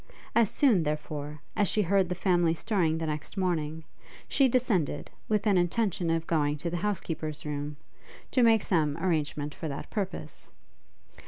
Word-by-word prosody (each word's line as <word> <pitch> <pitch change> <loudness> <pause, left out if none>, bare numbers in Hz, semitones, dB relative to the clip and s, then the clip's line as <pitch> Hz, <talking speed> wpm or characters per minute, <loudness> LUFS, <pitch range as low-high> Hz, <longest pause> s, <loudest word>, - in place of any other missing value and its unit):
As 230 -3 +4
soon, 245 - +4
therefore, 150 -1 -4
as 205 - +2
she 210 - +1
heard 190 0 +2
the 180 - -1
family 175 -3 +2
stirring 165 -3 +1
the 160 - -2
next 150 +4 -5
morning, 160 -4 -1 0.4
she 275 - +4
descended, 230 - 0 0.2
with 210 -1 +1
an 200 -4 +4
intention 175 -1 0
of 165 0 0
going 150 -3 +1
to 165 +3 -3
the 175 - -1
housekeeper's 165 -6 -3
room, 145 0 -4 0.5
to 255 - +3
make 225 -3 +5
some 155 -5 +1
arrangement 150 -4 -1
for 160 - -5
that 140 -1 -6
purpose. 195 -3 -5
170 Hz, 160 wpm, -29 LUFS, 150-200 Hz, 0.5 s, make